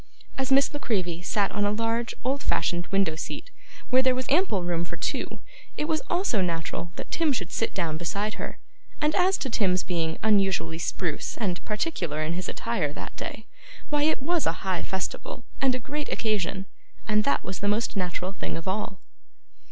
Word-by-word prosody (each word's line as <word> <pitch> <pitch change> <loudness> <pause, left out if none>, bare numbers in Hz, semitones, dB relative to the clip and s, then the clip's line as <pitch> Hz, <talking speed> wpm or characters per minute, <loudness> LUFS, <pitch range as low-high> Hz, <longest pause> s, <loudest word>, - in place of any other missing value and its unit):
As 265 0 -1
Miss 275 +2 +5
La 290 - -3
Creevy 180 -9 0
sat 200 +2 +1
on 205 - 0
a 205 - +3
large 230 +2 0
old 270 +3 +1
fashioned 175 +1 +1
window 195 -5 +2
seat, - - -5 0.4
where 255 +1 +7
there 260 -1 +4
was 255 0 -1
ample 285 - +3
room 170 -1 0
for 175 - -5
two, - - -2 0.4
it 300 - 0
was 315 -2 +1
also 345 - +2
natural 170 -1 -2
that - - -7
Tim 325 -3 +3
should 190 -9 -2
sit 225 - 0
down 165 -4 0
beside 200 +6 -1
her; - - -4 0.4
and 300 0 +3
as 375 +2 +4
to - - -2
Tim's 190 -6 +2
being 165 -3 -1
unusually 195 -6 +3
spruce 170 -3 -1
and 185 -6 -1
particular 195 - -1
in 160 +2 0
his 180 +2 -2
attire 225 -11 0
that - - -7
day, 220 - -5 0.5
why 295 -1 +3
it 300 -2 +2
was 340 +1 +2
a 165 - -1
high 185 -2 +1
festival 190 +5 -3 0.2
and 265 -2 +4
a - - -2
great 295 +5 -4
occasion, 200 -3 0 0.4
and 210 -1 +4
that 280 - +2
was 185 - -4
the 205 - 0
most 215 +2 +1
natural 185 0 -1
thing - - -3
of 165 - -6
all. 195 0 -1
205 Hz, 190 wpm, -27 LUFS, 175-260 Hz, 0.5 s, where